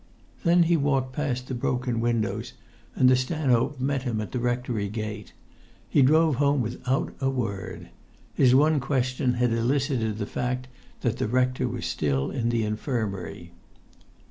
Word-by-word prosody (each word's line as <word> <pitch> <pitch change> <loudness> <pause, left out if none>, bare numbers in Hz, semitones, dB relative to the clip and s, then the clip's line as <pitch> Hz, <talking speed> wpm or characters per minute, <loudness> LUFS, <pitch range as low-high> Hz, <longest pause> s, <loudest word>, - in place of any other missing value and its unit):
Then 175 -1 +5
he 170 +1 +3
walked 135 -3 0
past 130 -3 -2
the - - -4
broken 125 -1 -1
windows, 115 -3 -1 0.4
and 130 - +4
the 130 - +6
stanhope 130 0 +1
met 135 +1 0
him 120 -4 -2
at 105 - -5
the 125 - -2
rectory 120 -4 -1
gate. 105 -1 -5 0.6
He 145 - +3
drove 155 +1 +4
home 140 0 +3
without 125 +3 -1
a 135 - +2
word. 115 -8 -4 0.4
His 125 -1 +4
one 150 +2 +4
question 125 -1 0
had 120 -1 +1
elicited 120 -2 0
the 105 - -2
fact 125 +3 -3 0.3
that - - 0
the - - -1
rector 125 +2 +1
was 120 -1 -4
still 70 -3 -1
in 120 -4 -1
the 120 -1 +1
infirmary. 105 -6 -3
125 Hz, 155 wpm, -26 LUFS, 115-135 Hz, 0.6 s, the